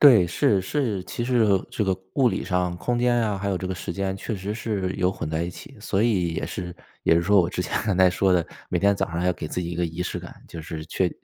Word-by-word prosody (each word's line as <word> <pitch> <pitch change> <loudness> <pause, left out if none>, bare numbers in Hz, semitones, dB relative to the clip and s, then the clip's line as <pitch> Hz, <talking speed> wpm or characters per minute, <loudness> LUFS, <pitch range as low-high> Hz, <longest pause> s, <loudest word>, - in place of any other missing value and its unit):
对， 120 -11 +8
是， 95 +3 +2
是， 110 -2 -1
其 120 - -4
实 125 0 +2 0.3
这 - - -1
个 95 -1 +1 0.2
物 130 -3 +4
理 - - -2
上、 90 -1 0
空 120 +7 -1
间 120 0 +3
呀， 105 -3 0
还 100 +1 -3
有 95 - 0
这 95 - -4
个 95 - -2
时 85 - -5
间 95 0 -2
确 105 +2 -4
实 100 +3 -4
是 100 -5 -2
有 90 -1 +2
混 80 - -5
在 80 +1 -1
一 85 - -3
起， - - -12
所 95 - 0
以 90 -8 +1
也 - - -2
是 90 -1 -5 0.3
也 - - +4
是 85 - +2
说 100 +3 +5
我 85 0 0
之 90 - -3
前 - - -6
刚 95 -4 0
才 95 - +7
说 95 +1 +2
的， 85 -3 +2 0.2
每 - - 0
天 100 0 +4
早 - - 0
上 85 - -3
还 90 - 0
要 90 - +4
给 80 -3 -6
自 90 - -2
己 85 - -3
一 85 - -4
个 85 - 0
仪 85 +1 -5
式 - - -3
感， - - -11
就 80 -2 -8
是 80 -1 -6
确 90 +1 0
95 Hz, 310 characters per minute, -25 LUFS, 85-105 Hz, 0.3 s, 对